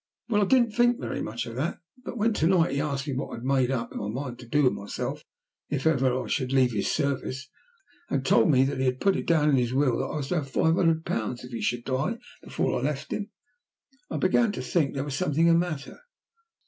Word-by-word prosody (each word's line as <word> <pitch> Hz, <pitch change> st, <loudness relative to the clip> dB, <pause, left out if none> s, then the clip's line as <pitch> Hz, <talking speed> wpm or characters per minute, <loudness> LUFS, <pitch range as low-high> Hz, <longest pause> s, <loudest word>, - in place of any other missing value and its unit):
Well, 210 Hz, -2 st, +3 dB
I -, -, +4 dB
didn't 240 Hz, +1 st, +3 dB
think 240 Hz, +2 st, +3 dB
very -, -, -4 dB
much 115 Hz, +2 st, -4 dB
of 115 Hz, -, -8 dB
that, 155 Hz, +7 st, -1 dB, 0.3 s
but 245 Hz, -, -6 dB
when 225 Hz, +1 st, +2 dB
to 160 Hz, -5 st, +1 dB
night 175 Hz, -4 st, +3 dB
he 140 Hz, +1 st, 0 dB
asked 140 Hz, -2 st, -2 dB
me 140 Hz, -, -2 dB
what 130 Hz, -, -4 dB
I -, -, -3 dB
had 115 Hz, -, -9 dB
made 130 Hz, -1 st, +2 dB
up 125 Hz, -3 st, -2 dB
my 100 Hz, -, -4 dB
mind 125 Hz, +2 st, -5 dB
to 120 Hz, -, -11 dB
do 145 Hz, +5 st, +2 dB
with 130 Hz, -, +4 dB
myself 100 Hz, +1 st, -5 dB, 0.5 s
if 145 Hz, 0 st, -2 dB
ever 130 Hz, -4 st, +2 dB
I -, -, -8 dB
should 130 Hz, -2 st, -1 dB
leave 130 Hz, -2 st, +4 dB
his 105 Hz, -3 st, -1 dB
service, 135 Hz, -2 st, -2 dB, 0.6 s
and 135 Hz, -1 st, -1 dB
told 115 Hz, -, +4 dB
me 130 Hz, -3 st, +5 dB
that 135 Hz, 0 st, -1 dB
he 130 Hz, -, +1 dB
had 130 Hz, 0 st, 0 dB
put 195 Hz, -1 st, +3 dB
it -, -, -3 dB
down 150 Hz, -3 st, +3 dB
in 135 Hz, -, +4 dB
his 125 Hz, 0 st, 0 dB
will 135 Hz, -4 st, +2 dB
that 130 Hz, -, -1 dB
I -, -, -5 dB
was 140 Hz, -3 st, -3 dB
to 180 Hz, -, +1 dB
have 140 Hz, -4 st, -3 dB
five 160 Hz, +4 st, +2 dB
hundred 165 Hz, -2 st, +2 dB
pounds 115 Hz, +3 st, -3 dB
if 125 Hz, -, -10 dB
he 115 Hz, -, -4 dB
should 120 Hz, 0 st, -1 dB
die 135 Hz, -, -1 dB, 0.3 s
before -, -, -1 dB
I -, -, -5 dB
left -, -, -2 dB
him, -, -, -4 dB, 0.8 s
I -, -, -3 dB
began 215 Hz, +4 st, +3 dB
to -, -, -4 dB
think 155 Hz, -7 st, 0 dB
there 135 Hz, -, -1 dB
was 145 Hz, -1 st, -5 dB
something 160 Hz, 0 st, +1 dB
the 170 Hz, -, +6 dB
matter. 165 Hz, -5 st, -1 dB
140 Hz, 250 wpm, -27 LUFS, 130-165 Hz, 0.8 s, the